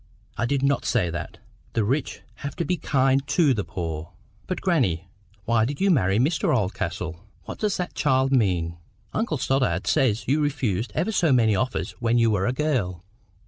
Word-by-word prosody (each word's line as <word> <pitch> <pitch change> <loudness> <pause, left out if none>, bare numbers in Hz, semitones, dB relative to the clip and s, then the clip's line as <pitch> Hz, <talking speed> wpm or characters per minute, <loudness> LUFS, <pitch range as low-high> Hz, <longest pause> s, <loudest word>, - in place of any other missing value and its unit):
I 120 - -1
did 140 +1 0
not 140 0 +2
say 95 -9 +1
that. 85 +1 -6 0.4
The 115 - +1
rich 130 +6 -1 0.2
have 140 0 -6
to 170 - -2
be 180 - +1
KIND 135 -3 +1
to 140 0 +3
the 105 -4 -1
poor." 80 -1 -5 0.3
"But, 185 - -2
grannie, 100 - +1 0.4
why 115 -1 +3
did 140 +5 -2
you 195 0 +3
marry 100 - +3
Mr 145 +8 +2
Oldcastle?" 90 -3 -3 0.2
"What - - -8
does 210 -2 0
the 180 - -1
child 135 -2 +2
mean?" 90 -9 +1 0.4
"Uncle 215 -8 -1
Stoddart 125 -10 0
says 115 -7 +1
you 145 +4 +2
refused 125 -8 -1
ever 175 +8 0
so 175 -7 +2
many 115 -5 +4
offers 125 +6 -1
when 115 0 +2
you 115 -1 +4
were 95 -2 +1
a - - +2
girl." 125 - -1
125 Hz, 185 wpm, -24 LUFS, 95-145 Hz, 0.4 s, many